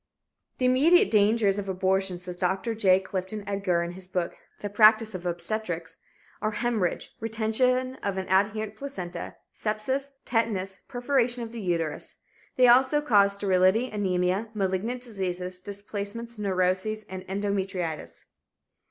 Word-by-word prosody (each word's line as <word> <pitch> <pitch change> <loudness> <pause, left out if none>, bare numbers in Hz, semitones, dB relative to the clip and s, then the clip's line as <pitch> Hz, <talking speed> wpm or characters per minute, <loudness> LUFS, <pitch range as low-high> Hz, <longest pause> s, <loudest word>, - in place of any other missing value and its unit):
"The 255 - 0
immediate 290 +8 +5
dangers 210 -1 +3
of 195 -1 -5
abortion," 190 0 0
says 180 0 -8
Dr. 190 +5 0
J. 190 -4 +4
Clifton 190 +2 -4
Edgar, 195 -4 0
in 170 - -4
his 185 +1 -9
book, 180 -2 -2 0.3
"The 205 - -2
Practice 215 +1 +5
of 180 -1 -5
Obstetrics," 175 -1 -3 0.4
"are 215 - +1
hemorrhage, 215 -4 -1
retention 250 +4 0
of 200 -1 -2
an 190 - -3
adherent 210 +3 +1
placenta, 215 -9 -6 0.2
sepsis, 260 +6 -2
tetanus, 210 -5 -1
perforation 245 -1 +1
of 225 - -7
the 235 -1 -6
uterus. 165 -5 -2 0.4
They 250 -1 +6
also 260 +4 +5
cause 205 -9 +4
sterility, 200 +4 +3
anemia, 190 +1 0
malignant 205 +5 -1
diseases, 185 -5 -3
displacements, 205 +4 -6
neurosis, 190 +2 0
and 185 -2 -7
endometritis." 190 - -3
200 Hz, 130 wpm, -27 LUFS, 185-225 Hz, 0.4 s, They